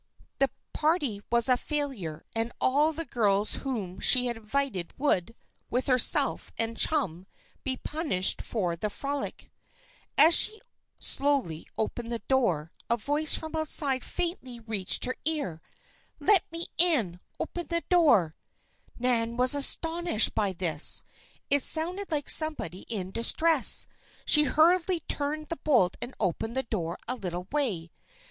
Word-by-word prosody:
The 275 0 +2 0.2
party 300 - -1
was 235 0 +3
a 250 -1 +4
failure 250 - -4
and 225 +1 -2
all 295 +4 +2
the 330 +1 -2
girls 210 -5 0
whom 205 -9 -6
she 250 -1 +4
had 240 -1 -2
invited 225 -4 -4
would, 230 -7 -1 0.3
with 250 +2 -2
herself 255 -3 +3
and 225 0 -2
chum, 190 - +1 0.4
be 260 -1 0
punished 295 - -2
for 180 -7 -3
the 210 +5 -4
frolic. 280 +5 -6 0.7
As 315 +4 +7
she 435 0 +7 0.4
slowly 275 - 0
approached 230 +2 -4
the 235 - -3
door, 205 - -1 0.2
a 235 - +1
voice 290 +6 0
from 315 0 -5
outside 290 -4 0
faintly 300 -9 -5
reached 220 -5 -2
her 255 - -3
ear: 285 - -2 0.6
"Let 405 -6 +3
me 335 +1 -3
in! 250 - +4 0.2
open 345 -1 -5
the 335 0 -2
door!" 240 - +3 0.6
Nan 235 -1 -1
was 250 +2 +3
astonished 325 -1 +2
by 205 -3 -1
this. 170 -4 +2 0.5
It 285 0 +4
sounded 355 +8 +2
like 300 -3 -2
somebody 305 - +3
in 190 -5 -4
distress. 310 +8 +3 0.4
She 300 -1 +6
hurriedly 340 +3 +2
turned 300 +1 -4
the 335 - -4
bolt 245 -12 +1
and 245 +2 -6
opened 220 +5 -3
the 265 - 0
door 175 -8 -4
a 250 - 0
little 180 -5 -6
way. 205 - -2
255 Hz, 140 wpm, -27 LUFS, 205-305 Hz, 0.7 s, As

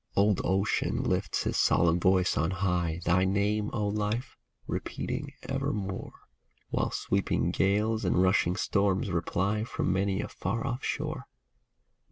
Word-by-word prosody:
Old 100 -1 +3
Ocean 95 +2 +1
lifts - - 0
his - - -1
solemn 85 0 +3
voice 95 +1 +3
on 80 +3 +1
high, 90 -3 -1
Thy 90 +2 +3
name, 105 +2 +1
O 105 -3 -1
Life, 105 +4 -2 0.3
repeating - - -4
evermore. 95 -2 -3 0.6
While - - 0
sweeping 100 0 0
gales 105 +3 +1
and 90 -1 +2
rushing 90 -1 +3
storms 100 -1 +1
reply 95 +5 0
From 105 -5 -1
many 95 0 0
a - - -2
far 110 +8 -3
off 130 -1 -3
shore. - - -3
95 Hz, 135 wpm, -29 LUFS, 90-105 Hz, 0.6 s, Old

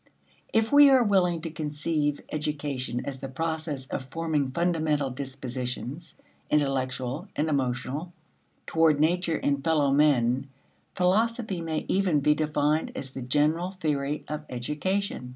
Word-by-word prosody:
If 225 0 +2
we 285 0 +8
are 260 -2 +6
willing 180 -5 +2
to 165 -1 -5
conceive 150 -1 -1
education 145 -5 -2
as 135 -1 -5
the 135 - -5
process 155 -1 -3
of 130 - -5
forming 155 -2 -1
fundamental 155 -3 0
dispositions, 130 +3 -5 0.3
intellectual 135 - 0
and 155 - 0
emotional, 140 +4 -2 0.5
toward 160 -3 +3
nature 170 +1 +2
and 140 -1 0
fellow 150 -3 +2
men, 135 -2 +3 0.5
philosophy 210 +1 +1
may 160 -2 -3
even 185 -6 +2
be 150 +2 +4
defined 150 0 0
as 135 -1 -6
the 135 - -6
general 150 +7 +1
theory 150 -2 -1
of 150 0 -4
education. 150 +4 -2
150 Hz, 130 wpm, -27 LUFS, 135-165 Hz, 0.5 s, we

